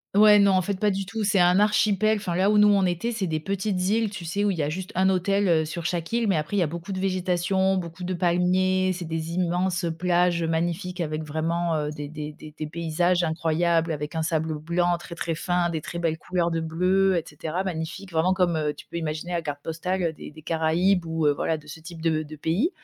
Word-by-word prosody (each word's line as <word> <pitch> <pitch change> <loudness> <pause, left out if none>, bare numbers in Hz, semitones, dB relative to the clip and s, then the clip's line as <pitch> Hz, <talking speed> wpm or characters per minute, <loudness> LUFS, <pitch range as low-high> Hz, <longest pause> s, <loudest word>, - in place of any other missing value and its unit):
Ouais, 210 0 +8
non, 200 -1 +5
en 185 0 +3
fait, 190 +1 -3
pas 210 -1 +2
du 195 -1 -3
tout, 220 0 -3
c'est 195 -1 +2
un 180 +2 +5
archipel. 210 0 +3
Enfin, 175 -4 -3
là 195 +3 +3
où 210 - +4
nous 210 - +7
on 200 -2 +4
était, 180 +7 -1
c'est 215 -4 -2
des 155 -2 -1
petites 195 +2 -2
îles, 220 -1 +1
tu 180 -4 -7
sais, 200 +5 -1
où 200 - +2
il 175 - -3
y - - 0
a 145 - 0
juste 185 +4 -5
un 190 +1 +3
hôtel, 195 +2 +1
heu, 160 -2 +3
sur 165 +1 -6
chaque 175 +3 -2
île, 235 -2 +1
mais 190 -5 +2
après, 155 +7 -3
il - - +3
y - - +3
a 165 - +2
beaucoup 170 +5 -6
de 190 - -3
végétation, 190 0 +1
beaucoup 170 0 -6
de 185 +1 -2
palmiers, 185 +2 +2
c'est 175 -1 -6
des 160 0 -4
immenses, 180 0 0
heu, 165 - 0
plages, 175 0 +1
heu, - - 0
magnifiques 175 +2 -2
avec 155 -1 -2
vraiment, 165 +2 -1
heu, 150 -1 -1
des 145 -1 -6
des 150 -1 -6
des 155 0 -12
des 155 - -5
paysages 170 +2 0
incroyables, 165 +1 +1
avec 150 +1 -4
un 160 - -1
sable 160 -1 -1
blanc 175 +2 +1
très 170 0 -9
très 165 -1 -2
fin, 175 +1 0
des 160 -2 -3
très 170 - -6
belles 160 -2 -1
couleurs 175 -2 -1
de 165 - 0
bleu, 180 +4 +2
et 165 - -1
cetera, 160 +5 -4
magnifiques, 185 +2 -5
vraiment, 165 +3 +2
comme, 175 -3 +2
heu, 150 -1 0
tu - - -12
peux 170 - -7
imaginer 160 +2 -4
la 170 -1 0
carte 145 -2 -5
postale, 180 +3 -2
heu, 165 -1 0
des - - -10
des 155 0 -14
Caraïbes 165 +3 +1
ou, 160 -1 -1
heu, 145 - +5
voilà, 160 +2 -1
de 150 - -15
ce 150 +2 -9
type 165 0 -10
de 160 -1 +1
de 155 0 -9
pays. 170 - 0
175 Hz, 260 wpm, -25 LUFS, 160-185 Hz, -, Ouais